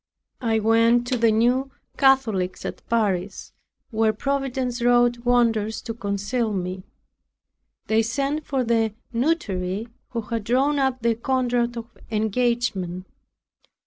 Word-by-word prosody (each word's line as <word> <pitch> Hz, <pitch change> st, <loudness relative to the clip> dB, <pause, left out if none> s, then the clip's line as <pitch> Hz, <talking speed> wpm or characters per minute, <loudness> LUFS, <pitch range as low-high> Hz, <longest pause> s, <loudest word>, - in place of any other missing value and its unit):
I 225 Hz, -2 st, +1 dB
went 230 Hz, +2 st, +3 dB
to 255 Hz, -, +1 dB
the 230 Hz, -1 st, +4 dB
New 245 Hz, +5 st, +2 dB, 0.3 s
Catholics 225 Hz, -10 st, +2 dB
at -, -, -5 dB
Paris, 200 Hz, -4 st, -1 dB, 0.4 s
where 220 Hz, -1 st, +2 dB
Providence 260 Hz, 0 st, -2 dB
wrought 240 Hz, 0 st, +3 dB
wonders 225 Hz, -3 st, +2 dB
to 230 Hz, -, -4 dB
conceal 210 Hz, +2 st, -2 dB
me. 185 Hz, 0 st, -3 dB, 1.0 s
They 220 Hz, +1 st, +3 dB
sent 275 Hz, +7 st, -1 dB
for 270 Hz, -2 st, 0 dB
the 225 Hz, -2 st, +1 dB, 0.2 s
notary, 225 Hz, -, -1 dB, 0.2 s
who 235 Hz, -, -3 dB
had 225 Hz, 0 st, -4 dB
drawn 270 Hz, +6 st, +2 dB
up 265 Hz, -3 st, 0 dB
the 235 Hz, 0 st, +3 dB
contract 240 Hz, 0 st, 0 dB
of 230 Hz, 0 st, -8 dB
engagement. 215 Hz, -5 st, -1 dB
230 Hz, 120 wpm, -23 LUFS, 215-250 Hz, 1.0 s, the